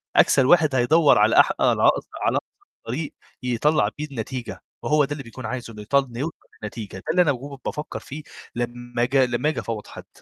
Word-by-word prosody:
أكسل 135 Hz, -, +5 dB
واحد 155 Hz, -2 st, +4 dB
هيدوّر 145 Hz, +5 st, +5 dB
على -, -, +5 dB
أح -, -, +6 dB
على -, -, +3 dB
أقص -, -, +3 dB
على -, -, +2 dB
أقصر -, -, -9 dB, 0.2 s
طريق 140 Hz, +6 st, -4 dB, 0.3 s
يطلّع 125 Hz, -1 st, +2 dB
بيه 150 Hz, -, -3 dB
النتيجة، 120 Hz, -6 st, -6 dB, 0.2 s
وهو 150 Hz, -1 st, +3 dB
ده 140 Hz, -, -12 dB
اللي 145 Hz, -1 st, -4 dB
بيكون 125 Hz, +1 st, -9 dB
عايزه 120 Hz, -1 st, -5 dB
إن 105 Hz, -, -11 dB
يطل 140 Hz, +6 st, +2 dB
إنه 120 Hz, -2 st, -9 dB
يوصل 160 Hz, +5 st, -3 dB, 0.3 s
لنتيجة 105 Hz, -1 st, -6 dB
ده -, -, -11 dB
اللي 180 Hz, +2 st, +4 dB
أنا 160 Hz, -5 st, +4 dB
وهو 140 Hz, +2 st, -6 dB
كنت 130 Hz, -, -36 dB
بافكّر 150 Hz, +1 st, -4 dB
فيه 150 Hz, +3 st, -9 dB, 0.3 s
لمّا 120 Hz, 0 st, -2 dB
ج 130 Hz, -, -4 dB
لمّا 125 Hz, +2 st, +2 dB
آجي 155 Hz, -, -2 dB
أفوّض 110 Hz, -2 st, -5 dB
حد. -, -, -11 dB
130 Hz, 210 wpm, -23 LUFS, 120-150 Hz, 0.3 s, أح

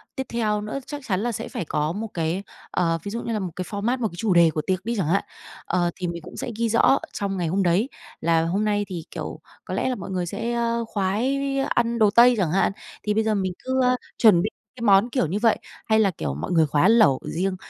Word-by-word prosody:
tiếp 265 Hz, -2 st, -4 dB
theo 215 Hz, -3 st, 0 dB
nữa 215 Hz, +6 st, -4 dB
chắc 290 Hz, -1 st, -6 dB
chắn 185 Hz, -3 st, 0 dB
là 240 Hz, +1 st, 0 dB
sẽ -, -, -5 dB
phải 175 Hz, -, -4 dB
có 150 Hz, +1 st, -1 dB
một 210 Hz, +5 st, -4 dB
cái, 170 Hz, +3 st, -1 dB, 0.3 s
ờ, 165 Hz, -2 st, +1 dB
ví 200 Hz, -, -5 dB
dụ 230 Hz, -, -3 dB
như 230 Hz, -, -3 dB
là 215 Hz, -, -1 dB
một 185 Hz, -3 st, -4 dB
cái 185 Hz, -, -4 dB
format, 225 Hz, +5 st, -1 dB
một 225 Hz, -, +1 dB
cái 175 Hz, -, -10 dB
chủ 200 Hz, 0 st, +1 dB
đề 170 Hz, -1 st, +6 dB
của 155 Hz, -, -2 dB
tiệc 185 Hz, +1 st, -1 dB
đi 235 Hz, +1 st, -1 dB
chẳng 185 Hz, -7 st, 0 dB
hạn. 190 Hz, +5 st, +2 dB, 0.4 s
Ờ, 175 Hz, -1 st, +1 dB
thì 180 Hz, -, -3 dB
mình 170 Hz, -1 st, -5 dB
cũng -, -, -11 dB
sẽ -, -, -4 dB
ghi 230 Hz, 0 st, +1 dB
rõ 230 Hz, -, +2 dB
ở 275 Hz, -, +5 dB
trong 195 Hz, -1 st, -2 dB
ngày 175 Hz, -, -1 dB
hôm 190 Hz, +4 st, +1 dB
đấy 185 Hz, +8 st, +2 dB, 0.3 s
là 165 Hz, 0 st, +2 dB
hôm 195 Hz, +6 st, 0 dB
nay 205 Hz, -1 st, +1 dB
thì, 175 Hz, -4 st, -5 dB
kiểu, -, -, -6 dB, 0.3 s
có -, -, -5 dB
lẽ -, -, 0 dB
là 255 Hz, -, -1 dB
mọi 190 Hz, -4 st, -7 dB
người 180 Hz, -1 st, -1 dB
sẽ, 230 Hz, +7 st, -3 dB
ơ, 235 Hz, 0 st, 0 dB
khoái 215 Hz, +8 st, 0 dB, 0.3 s
ăn 235 Hz, 0 st, +1 dB
đồ 210 Hz, -2 st, +5 dB
Tây 240 Hz, +2 st, +6 dB
chẳng 180 Hz, -6 st, +1 dB
hạn, 190 Hz, +2 st, +2 dB, 0.3 s
thì 210 Hz, -, 0 dB
bây 220 Hz, +1 st, +2 dB
giờ 220 Hz, -1 st, +1 dB
mình 190 Hz, -2 st, -1 dB
cứ, 260 Hz, 0 st, 0 dB
a, 250 Hz, 0 st, +4 dB, 0.2 s
chuẩn 210 Hz, -7 st, +6 dB
bị 210 Hz, -, 0 dB, 0.3 s
cái 245 Hz, -, -11 dB
món, 200 Hz, +2 st, +5 dB
kiểu 245 Hz, -, 0 dB
như 195 Hz, +6 st, -2 dB
vậy, 225 Hz, -1 st, +3 dB, 0.3 s
hay 220 Hz, 0 st, +3 dB
là, 200 Hz, -3 st, +3 dB
kiểu, 70 Hz, -, -4 dB
mọi 75 Hz, -, -4 dB
người 165 Hz, -3 st, +4 dB
khoái 145 Hz, +6 st, +3 dB
lẩu 220 Hz, -, +5 dB
riêng. 185 Hz, +3 st, -1 dB
200 Hz, 270 wpm, -24 LUFS, 175-230 Hz, 0.4 s, đề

